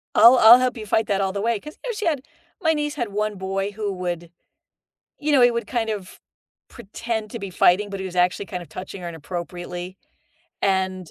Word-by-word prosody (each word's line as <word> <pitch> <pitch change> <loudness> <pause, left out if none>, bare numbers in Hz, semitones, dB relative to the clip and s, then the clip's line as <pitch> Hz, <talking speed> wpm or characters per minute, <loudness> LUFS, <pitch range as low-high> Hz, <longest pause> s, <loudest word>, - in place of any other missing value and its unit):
I'll 240 +3 +8
I'll 230 +3 +9
help 255 -1 0
you 215 - -6
fight 220 +2 +1
that 200 -1 +1
all 190 -1 0
the 200 - -3
way, 230 0 0
'cause, 300 +6 -11
you - - -4
know, - - -5
she 425 - -4
had 300 -6 +1 0.4
my 320 -2 +3
niece 295 -1 -2
had 240 -6 -2
1 210 +1 -2
boy 195 +1 -2
who 205 -1 -3
would, 175 -2 -4 0.9
you 300 +1 0
know, 275 - +5
he 245 0 +6
would 235 -3 -3
kind 230 -3 -1
of 200 -4 -6 0.5
pretend 225 -1 -5
to 235 - -5
be 200 -2 -5
fighting, 190 +3 +3
but 195 -1 -5
he 190 - -4
was 185 -1 -7
actually 180 +2 +2
kind 180 -1 -5
of - - -17
touching 190 +1 -8
her 175 - -5
inappropriately, 175 +2 -6 0.6
and 185 -2 0
200 Hz, 220 wpm, -23 LUFS, 185-235 Hz, 0.9 s, I'll